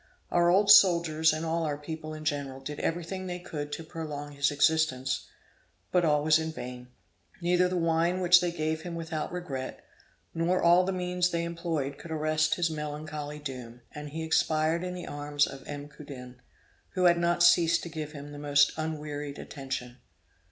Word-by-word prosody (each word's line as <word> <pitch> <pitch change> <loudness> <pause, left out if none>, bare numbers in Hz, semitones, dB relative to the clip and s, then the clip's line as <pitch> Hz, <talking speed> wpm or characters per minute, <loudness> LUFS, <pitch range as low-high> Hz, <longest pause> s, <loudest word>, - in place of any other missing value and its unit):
Our 175 0 +4
old 200 +3 +5
soldiers 165 -4 +6
and 155 +1 -3
all 165 +1 0
our 150 -2 -1
people 155 +1 -7
in 155 0 -9
general 140 -3 -2
did 145 +2 -6
everything 175 +3 -3
they 180 0 -3
could 150 -4 -6
to 165 - -5
prolong 150 -3 -6
his 140 0 +1
existence, 145 -3 +1 0.6
but 180 -1 +3
all 150 -2 +3
was 155 +1 +5
in 160 0 -3
vain. 125 -4 -8 0.5
Neither 180 +1 +3
the 180 - -1
wine 165 +2 +1
which 175 -1 +6
they 175 -1 0
gave 160 -1 -2
him 170 0 -6
without 160 -2 -4
regret, 175 -8 -5 0.5
nor 170 +3 +1
all 175 +2 +5
the 190 - 0
means 180 -1 0
they 170 -1 -1
employed, 165 -5 -3
could 170 - -10
arrest 155 0 +1
his 175 -1 +1
melancholy 150 -1 -5
doom, 125 -5 -8
and 150 0 -7
he 160 +2 -5
expired 160 +1 +1
in 180 0 -4
the 180 - -6
arms 145 0 0
of 135 - -8
M. 145 0 -6
Coudin, 130 -4 -11 0.5
who 185 - +1
had 170 -1 +5
not 175 0 +2
ceased 170 -1 +5
to 170 - -6
give 155 -1 -6
him 145 0 -8
the 145 - -8
most 145 0 +4
unwearied 150 -2 -4
attention. 130 -3 -6
155 Hz, 180 wpm, -29 LUFS, 145-170 Hz, 0.6 s, soldiers